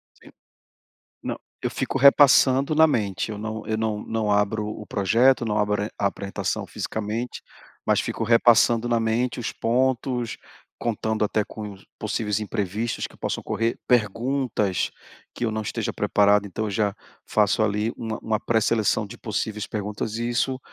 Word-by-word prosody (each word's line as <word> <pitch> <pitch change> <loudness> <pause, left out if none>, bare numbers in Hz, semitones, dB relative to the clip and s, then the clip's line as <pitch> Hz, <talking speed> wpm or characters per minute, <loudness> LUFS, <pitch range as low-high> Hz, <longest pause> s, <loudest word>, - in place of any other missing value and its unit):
Sim, - - -17 0.9
não, - - -4 0.2
eu - - -1
fico 135 - -2
repassando 140 +1 +6
na 160 +1 +7
mente, 105 - -1
eu 105 - -5
não 110 0 -5
eu 110 -1 -1
não 110 -1 -1
não 110 -2 -1
abro 105 +1 +1
o 105 0 -7
projeto, 115 +6 +3
não 105 -1 0
abro 105 0 +1
e 110 - -5
a 100 - +1
apresentação 100 0 -3
fisicamente, 110 +3 -4 0.4
mas - - +3
fico 115 - -3
repassando 115 0 +4
na 120 -1 +2
mente 115 +3 0
os - - -3
pontos, 125 -1 0 0.4
contando 110 -1 -1
até 105 0 0
com 105 -2 -8 0.2
possíveis 110 -1 -1
imprevistos 105 +1 -2
que - - -18
possam - - -3
ocorrer, 115 +1 -1
perguntas 115 -3 +1 0.4
que 120 - -3
eu 110 - +1
não 110 0 -2
esteja - - -3
preparado, 105 0 +3
então 100 +3 -4
eu - - -3
já 100 0 0 0.3
faço 105 0 +2
ali 105 +2 0
uma 110 -1 -4
uma 110 -1 0
pré-seleção 110 -2 +1
de - - -11
possíveis 105 -1 -3
perguntas 105 +1 -4
e 120 0 -2
isso, 130 +2 0
110 Hz, 160 wpm, -24 LUFS, 105-120 Hz, 0.9 s, na